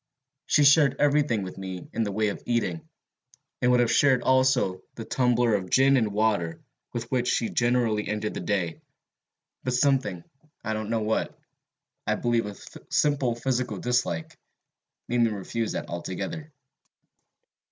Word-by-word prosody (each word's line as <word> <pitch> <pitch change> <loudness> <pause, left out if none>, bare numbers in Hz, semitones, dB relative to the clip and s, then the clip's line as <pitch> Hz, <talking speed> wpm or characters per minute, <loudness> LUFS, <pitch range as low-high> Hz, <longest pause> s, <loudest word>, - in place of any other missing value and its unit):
She 150 - +4
shared 145 -1 +6
every 145 0 +3
thing 115 -8 -1
with 95 0 -8
me 95 -2 -6
in - - -1
the 105 -2 -1
way 105 +1 +1
of - - -6
eating, 150 +7 -1 0.7
and 125 - +3
would 125 0 +4
have 120 -1 +2
shared 130 0 +4
also 130 -8 +2
the 115 - -7
tumbler 120 -2 +2
of 95 -3 -1
gin 135 +4 +5
and 110 -5 +1
water 100 -6 0 0.3
with 115 0 -5
which 125 -2 0
she 115 - +1
generally 120 -3 +1
ended 105 0 -2
the - - -4
day, 90 -6 -2 0.8
but 130 -1 -1
something, 130 -10 +1 0.4
I 110 - -2
don't 110 0 -4
know 115 -1 0
what, 110 +1 -1 0.7
I - - +2
believe 120 -2 0
a 105 - -7 0.3
simple 140 -5 +1
physical 125 -3 -2
dislike, 110 -9 -1 0.7
made 120 0 +1
me 115 - +4
refuse 110 +2 -3
that - - -4
altogether. 145 - -5
115 Hz, 155 wpm, -26 LUFS, 105-130 Hz, 0.8 s, shared